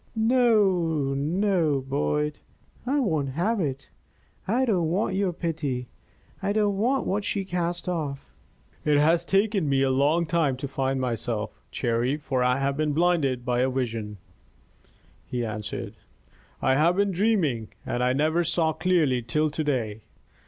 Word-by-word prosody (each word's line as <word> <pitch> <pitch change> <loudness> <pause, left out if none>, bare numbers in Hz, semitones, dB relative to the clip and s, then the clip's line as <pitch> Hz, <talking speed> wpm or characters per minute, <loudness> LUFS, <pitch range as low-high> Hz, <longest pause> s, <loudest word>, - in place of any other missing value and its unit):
No, 200 - +2
no, 160 +1 +1
Boyd! 145 +2 -1 0.5
I 285 +3 +2
won't 155 - 0
have 205 - 0
it. 135 -6 -3 0.6
I 245 +6 +2
don't 180 -9 +1
want 185 +3 0
your 195 -1 +1
pity 150 -8 -3 0.5
I 200 +1 0
don't 205 -2 +2
want 255 +4 +1
what 200 +2 -1
she 195 -1 -2
cast 175 -1 -2
off." 150 -6 -3 0.6
"It 150 -1 +3
has 165 +3 +4
taken 195 -2 +1
me 135 -1 +3
a 135 - +2
long 145 +6 +2
time 155 -5 +1
to 140 - -4
find 135 0 -1
myself, 115 -3 -2 0.2
Cherry, 120 +3 0
for 135 -4 -2
I 125 +1 +2
have 135 0 0
been 150 0 0
blinded 150 -7 +1
by 125 -1 +1
a 130 +1 +2
vision," 115 -5 -3 1.1
he 120 -1 -2
answered. 105 -1 -5 0.7
"I 130 - +4
have 160 +6 +3
been 200 0 +2
dreaming, 175 - +1 0.2
and 120 - -2
I 125 - +3
never 155 +6 +2
saw 165 -1 +1
clearly 160 -8 +2
till 150 +6 0
to 155 - -2
day. 115 -7 -2
150 Hz, 150 wpm, -26 LUFS, 130-180 Hz, 1.1 s, has